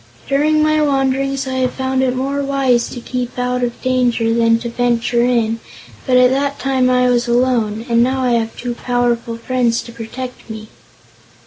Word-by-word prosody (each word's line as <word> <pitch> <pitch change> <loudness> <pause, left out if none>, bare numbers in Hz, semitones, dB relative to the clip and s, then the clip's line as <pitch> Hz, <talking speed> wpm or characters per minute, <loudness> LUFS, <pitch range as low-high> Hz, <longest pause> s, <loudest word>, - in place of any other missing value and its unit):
During 305 +2 +2
my 310 0 +2
wanderings 275 -1 0
I 260 0 -3
have 255 -1 0
found 260 0 -1
it 255 -1 +1
more 275 +2 -2
wise 270 -4 +1
to 245 - -7
keep 250 +1 -5
out 250 0 -1
of 240 -1 -3
danger 245 -3 +1
than 230 0 +3
to 235 - -4
venture 235 0 0
in, 230 -2 +1 0.5
but 255 -1 +4
at 250 0 +5
that 280 +1 -1
time 260 -2 +1
I 250 0 +3
was 245 -1 +1
alone, 235 -3 +1
and 235 -1 +3
now 260 +2 +1
I 250 - +1
have 230 -1 -1
two 245 -1 -4
powerful 240 -1 -1
friends 235 -1 0
to 235 - -11
protect 240 +2 -8
me." 215 -1 -8
250 Hz, 185 wpm, -17 LUFS, 235-260 Hz, 0.5 s, at